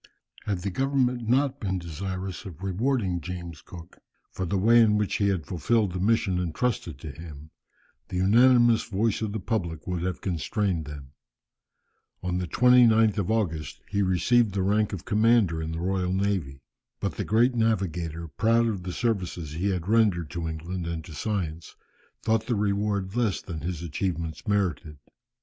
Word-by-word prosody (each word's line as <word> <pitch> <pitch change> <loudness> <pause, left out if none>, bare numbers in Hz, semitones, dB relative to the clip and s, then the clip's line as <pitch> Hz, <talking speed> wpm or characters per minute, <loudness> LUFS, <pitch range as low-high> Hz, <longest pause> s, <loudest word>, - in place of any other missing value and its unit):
Had 100 -3 -2
the 100 - -2
government 125 -1 0
not 135 +2 +2
been 95 -3 -1
desirous 95 +2 -5
of 90 -1 -9
rewarding 95 -2 0
James 85 -2 -7
Cook 85 -2 -12 0.3
for 95 - -3
the 100 - 0
way 115 +5 +6
in 105 -2 +4
which 105 -1 0
he 100 - +2
had 95 -5 0
fulfilled 105 +4 +1
the 90 - -3
mission 100 -2 +2
entrusted 90 - -2
to 80 - -6
him, 75 -1 -11 0.6
the - - -5
unanimous 120 +4 +5
voice 110 0 0
of 110 -2 -2
the 110 - -3
public 85 -6 -3
would 90 -2 -2
have 90 0 -2
constrained 90 -1 -1
them. 70 -2 -9 1.1
On 90 0 -1
the 90 - -3
29th 115 0 +5
of 100 - -1
August 90 -9 -1
he 100 0 0
received 100 +3 +2
the 95 - +1
rank 105 +2 +2
of 95 -4 -6
commander 105 -6 +3
in 80 0 -4
the 80 - -4
Royal 90 0 -1
Navy. 95 -9 -1 0.4
But - - -3
the - - -1
great 120 +4 +3
navigator, 90 -8 -1
proud 115 +10 +2
of 105 -5 -1
the 90 0 -5
services 90 - -2
he 90 +6 -1
had 90 -2 -2
rendered 100 -8 +2
to 85 -1 -3
England 85 +2 -5
and 80 -1 -4
to 85 - -10
science, 85 -3 -3 0.5
thought 110 0 +1
the 120 - +1
reward 100 -1 -1
less 115 -5 +1
than 80 -4 -7
his 85 +1 -4
achievements 80 -1 -3
merited. 90 -7 -1
95 Hz, 170 wpm, -26 LUFS, 85-110 Hz, 1.1 s, way